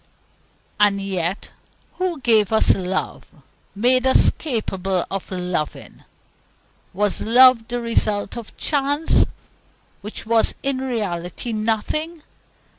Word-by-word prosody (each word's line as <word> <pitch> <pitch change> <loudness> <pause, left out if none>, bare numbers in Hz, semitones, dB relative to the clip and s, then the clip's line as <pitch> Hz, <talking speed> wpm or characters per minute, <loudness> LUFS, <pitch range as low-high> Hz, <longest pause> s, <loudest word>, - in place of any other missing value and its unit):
And 205 -1 +3
yet 190 -1 -3 0.5
who 365 -4 -2
gave 220 -4 +3
us 220 - +4
love 185 0 -3 0.5
made 250 +4 +3
us 260 - +5
capable 195 - -2
of 195 -1 -4
loving? 180 -4 -5 0.9
Was 205 +2 -1
love 245 0 +5
the 245 0 -3
result 215 -4 -1
of 235 -2 -9
chance, 290 +2 +1 0.7
which 210 +2 -8
was 225 0 +2
in 275 -1 -1
reality 215 -4 -3
nothing? 260 +10 -2
220 Hz, 105 wpm, -21 LUFS, 195-255 Hz, 0.9 s, us